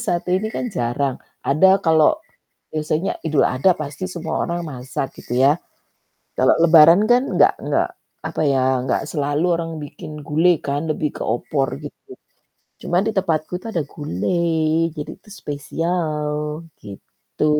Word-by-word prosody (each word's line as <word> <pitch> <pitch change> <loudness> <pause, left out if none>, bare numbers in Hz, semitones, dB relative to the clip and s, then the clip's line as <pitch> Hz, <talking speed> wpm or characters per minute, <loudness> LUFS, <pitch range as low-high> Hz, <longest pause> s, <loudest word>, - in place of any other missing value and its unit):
satu 175 -1 -1
ini 205 +3 -2
kan - - -2
jarang, 130 +1 -1 0.3
ada 150 +7 +4 0.2
kalau 160 - +5 0.6
biasanya 155 +3 -1
Idul 155 -3 +3
Adha 135 +9 +3
pasti 145 +4 -6
semua 165 -3 -4
orang 170 0 -2
masak 130 -1 -4
gitu - - -9
ya, 140 - +6 0.9
kalau - - +5
lebaran 165 +2 +8
kan 245 +2 +5
enggak - - +5
enggak - - +1 0.4
apa - - -3
ya, 130 -1 +2
enggak 130 - 0
selalu 145 +2 0
orang 165 0 -4
bikin 145 +1 -9 0.2
gulai 165 +3 +3
kan, 140 +1 -1
lebih 155 -1 0
ke - - -2
opor 135 +4 -1
gitu, 150 - -11 0.7
cuma 175 - +1
di 220 - +1
tempatku 160 -5 0
itu 230 - -8
ada 170 -7 -1
gulai 160 - 0
jadi 150 - -5
itu - - -21
spesial 155 -1 -2 0.5
gitu. 100 +8 -6
155 Hz, 145 wpm, -21 LUFS, 140-170 Hz, 0.9 s, lebaran